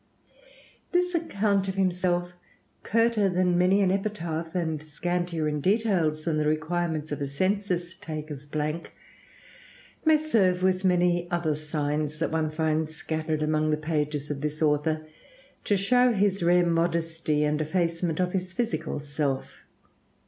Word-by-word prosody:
This 360 0 +1
account 200 - +1
of 190 - -2
himself, 180 -2 0 0.5
curter 230 -2 +2
than 180 -1 +2
many 185 +3 +4
an 190 -2 +3
epitaph, 170 -5 -3
and 160 -4 -1
scantier 170 +1 -2
in 150 -1 -1
details 185 -6 +1
than 155 -2 0
the 150 - +1
requirements 160 0 -1
of 145 - -3
a 140 - -1
census 180 +3 -1
taker's 155 -4 -7
blank, 155 +2 -3 1.1
may 315 -1 +5
serve, 195 -12 +2
with 185 0 +2
many 175 -1 +2
other 170 -3 0
signs 150 0 -2
that 165 - -1
one 160 -1 0
finds 155 0 -1
scattered 155 0 -2
among 155 0 +1
the 150 - +2
pages 150 -1 -2
of 140 -1 -4
this 150 0 -3
author, 155 +1 +1 0.6
to 205 - +2
show 245 +5 +4
his 200 -2 +1
rare 175 +1 +4
modesty 165 -2 0
and 150 +1 +1
effacement 165 0 -1
of 180 -1 +1
his 185 -1 -2
physical 235 -9 -2
self. 145 -2 -3
170 Hz, 140 wpm, -27 LUFS, 155-185 Hz, 1.1 s, may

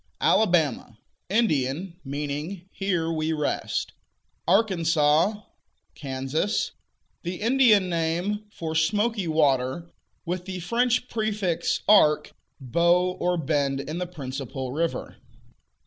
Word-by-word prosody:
Alabama 160 - +2 0.3
Indian; 170 - 0
meaning 150 +6 -4
"Here 175 -4 -1
we 160 0 -1
rest." 150 -2 -2 0.5
Arkansas" 170 -1 +3 0.5
Kansas," 135 +8 -2 0.5
the 175 +1 -4
Indian 225 -4 +4
name 175 +5 -1
for 160 -4 -5
"smoky 205 +5 +1
water," 150 +1 +1 0.3
with 180 +1 -3
the 185 -1 -5
French 240 +7 +1
prefix 215 -7 -1
"arc," 155 -8 +5 0.3
bow 170 +7 +2
or 180 0 +1
bend 140 -3 0
in 150 +5 -4
the 180 - -2
principal 135 -5 -5
river. 165 +4 -3
170 Hz, 100 wpm, -25 LUFS, 150-195 Hz, 0.5 s, arc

